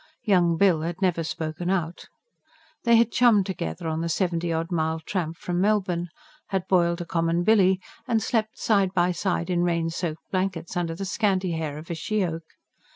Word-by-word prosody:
Young 175 -5 +3
Bill 185 -5 +4
had 170 +2 -4
never 180 -4 +1
spoken 160 +2 -4
out. 175 -3 -2 0.8
They 235 0 +6
had 230 0 +4
chummed 230 -5 +4
together 165 - -4
on 160 0 -1
the 170 - -2
seventy 170 0 0
odd 165 +2 -2
mile 160 -1 0
tramp 165 -1 -3
from 175 0 -2
Melbourne; 190 -4 +1 0.4
had 190 -2 -2
boiled 170 -2 +2
a - - -4
common 165 +1 0
billy 190 -2 +4 0.3
and 225 - +2
slept 220 -1 -1
side 200 -3 +1
by 175 0 +3
side 180 0 -1
in 175 -1 +1
rain 170 -1 0
soaked 165 -2 -5
blankets, 185 -2 -2
under 170 -2 -1
the 195 +3 -5
scanty 190 -2 0
hair 160 -3 -3
of 155 +3 -8
a - - 0
she 195 +5 -1
oak. 165 -1 -4
175 Hz, 185 wpm, -25 LUFS, 165-195 Hz, 0.8 s, They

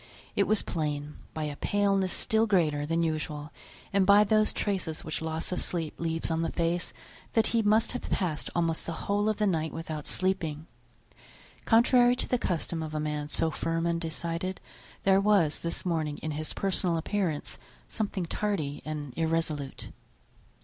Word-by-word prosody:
It 200 - +3
was 215 0 +2
plain, 150 -2 -3 0.2
by 155 - -2
a 150 -1 -3
paleness 195 +1 +1
still 220 +1 +2
greater 155 -7 +2
than 165 +1 +1
usual, 155 -2 -2 0.4
and 195 -1 +4
by 200 +2 +7
those 215 +1 +3
traces 185 -6 -2
which 155 0 -3
loss 160 +1 -2
of 180 - -1
sleep 165 -3 -3
leaves 165 0 -1
on 165 0 +1
the 165 - -1
face, 170 +1 0 0.4
that 225 -1 +4
he 230 - +4
must 215 +1 +3
have 250 - -5
passed 165 -6 -1
almost 165 -2 0
the 165 - -2
whole 205 +1 +2
of 215 - 0
the 210 - +2
night 160 -5 +1
without 160 -2 -5
sleeping. 165 -5 0 1.0
Contrary 245 +1 +5
to 250 - -3
the 250 - +1
custom 170 -3 -2
of 155 -1 -5
a - - 0
man 150 -1 -2
so 160 +1 +1
firm 165 +1 -1
and 170 0 0
decided, 170 +3 -3 0.4
there 195 0 +5
was 195 -7 +3
this 170 +2 -3
morning 155 -4 0
in 155 - -2
his 155 +1 -3
personal 185 -3 0
appearance 170 -3 -2 0.3
something 205 -4 -2
tardy 165 -6 -2
and 150 -3 -5
irresolute. 160 -4 -1
165 Hz, 170 wpm, -29 LUFS, 155-200 Hz, 1.0 s, by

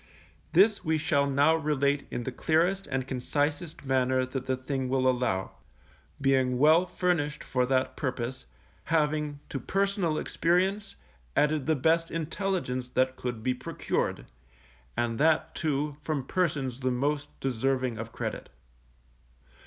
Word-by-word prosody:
This 200 +4 +5
we 160 0 +1
shall 145 -2 +1
now 145 +4 +4
relate 145 -2 0
in 120 - -3
the 130 - -3
clearest 170 +8 +1
and 135 -1 -2
concisest 145 +4 -2
manner 130 -1 +2
that 130 0 -5
the 130 -1 0
thing 130 0 -3
will 130 0 +2
allow; 120 -7 0 0.7
being 130 -2 +2
well 160 +6 +5
furnished 170 -5 -1
for 125 -1 0
that 130 0 +1
purpose, 130 - -4 0.4
having 150 -2 0
to 135 - -3
personal 195 - 0
experience 195 +4 0 0.4
added 150 -2 +2
the 160 - +3
best 165 +4 +2
intelligence 165 -6 -2
that 130 +1 +1
could 120 -4 -5
be 130 - +2
procured, 125 - -2 0.7
and 115 -1 0
that, 160 +1 +3
too, 150 -2 -1
from 150 -3 -2
persons 140 -8 -1
the 130 -1 0
most 145 +4 -1
deserving 130 -1 0
of 115 0 -6
credit. - - -5
140 Hz, 135 wpm, -28 LUFS, 130-160 Hz, 0.7 s, This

